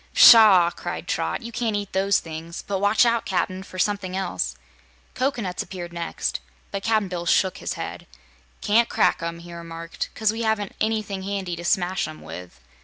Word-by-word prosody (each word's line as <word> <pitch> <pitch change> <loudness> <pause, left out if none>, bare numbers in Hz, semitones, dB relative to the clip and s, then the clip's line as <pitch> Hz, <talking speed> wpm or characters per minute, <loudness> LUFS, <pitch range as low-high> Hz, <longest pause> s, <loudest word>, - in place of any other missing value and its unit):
"Pshaw!" 215 - +9
cried - - -6
Trot. - - -2
"You 235 - -7
can't 225 -2 -1
eat 205 -1 -4
those 195 +1 +3
things; 165 +1 -7
but 195 -1 -2
watch 205 +4 +4
out, 235 -1 +2
Cap'n, 185 0 -1
for 185 -1 -11
something 190 -1 -1
else." 95 - -2 0.6
Cocoanuts 240 -9 -1
next - - -3
appeared, 175 -2 -4 0.3
but 200 - -3
Cap'n 215 -1 +1
Bill 175 -2 -5
shook 190 +1 +2
his - - -3
head. - - -7 0.6
"Ca'n't 230 +3 +3
crack - - +2
'em," 170 0 -3
he 170 0 -11
remarked, 165 0 -6
"'cause 220 -1 +2
we 225 +1 -4
haven't 220 -3 -1
anything 215 -3 -1
handy 190 -2 -3
to 170 - -8
smash 185 0 +1
'em 155 0 -10
with." 90 -5 -9
190 Hz, 180 wpm, -24 LUFS, 170-215 Hz, 0.6 s, Pshaw